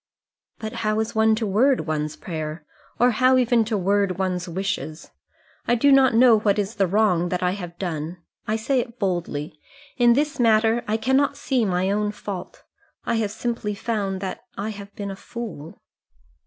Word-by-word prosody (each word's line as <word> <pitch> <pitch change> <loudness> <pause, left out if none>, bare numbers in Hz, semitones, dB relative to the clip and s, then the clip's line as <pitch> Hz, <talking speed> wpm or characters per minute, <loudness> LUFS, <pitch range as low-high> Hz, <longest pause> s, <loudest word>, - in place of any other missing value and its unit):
"But 220 -1 -6
how 215 0 +1
is 220 +1 -2
one 220 0 +4
to 225 0 -2
word 245 +7 +3
one's 155 -1 -3
prayer, 155 -2 -6 0.3
or 245 +1 +5
how 255 +3 +4
even 240 -2 +3
to 220 -1 -1
word 195 -1 +1
one's 185 -1 -2
wishes? 170 -3 -4 0.6
I 240 - +4
do 280 +4 +4
not 270 -3 +5
know 235 -2 +6
what 205 -1 +1
is 205 +1 -1
the 195 - +3
wrong 180 -3 +2
that 180 0 -2
I 180 - +2
have 175 -3 -7
done. 170 -2 -4 0.3
I 215 - +1
say 250 +4 0
it 235 0 -5
boldly; 170 -7 -3 0.4
in 240 -2 +5
this 295 +3 0
matter 225 0 +3
I 215 +1 +1
cannot 265 +5 +1
see 255 -5 0
my 185 0 0
own 210 0 0
fault. 200 -3 -7 0.4
I 230 - 0
have 215 -2 0
simply 215 -1 -3
found 200 -3 -2
that 190 -2 -4 0.2
I 205 +2 -3
have 200 -1 -8
been 200 -1 -5
a - - -6
fool." 195 -8 -8
210 Hz, 180 wpm, -23 LUFS, 185-230 Hz, 0.6 s, know